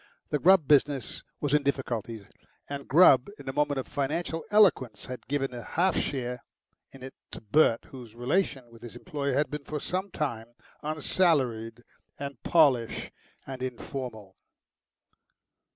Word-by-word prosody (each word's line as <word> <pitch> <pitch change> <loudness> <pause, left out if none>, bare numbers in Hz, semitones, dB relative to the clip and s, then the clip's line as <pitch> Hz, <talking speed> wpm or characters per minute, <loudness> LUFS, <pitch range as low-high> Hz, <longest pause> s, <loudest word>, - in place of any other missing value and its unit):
The 150 - +1
Grubb 180 -3 +5
business 140 -4 +2 0.2
was 145 -1 -1
in 150 - +4
difficulties, 120 -6 -3 0.4
and 140 -1 -6
Grubb 140 -4 +6
in - - -13
a 135 - -3
moment 145 -1 +1
of 130 - -5
financial 160 +4 -2
eloquence 185 - +3
had 125 0 -8
given 135 -2 -1
a 120 - -6
half 175 - 0
share 125 -3 -3 0.5
in 135 -1 -13
it 130 - -8 0.2
to - - -8
Bert, 115 +2 +2
whose 120 -4 -11
relations 130 -1 -1
with 115 -1 -15
his 120 -1 -10
employer 140 +2 -3
had 145 +3 +1
been 150 -1 -5
for 150 +1 -4
some 185 +6 -3
time 120 -8 -4 0.3
unsalaried 135 -7 0 0.3
and 140 0 -7
pallish 140 -9 +2 0.3
and 130 -1 -7
informal. 120 -5 -6
135 Hz, 145 wpm, -28 LUFS, 120-150 Hz, 0.5 s, Grubb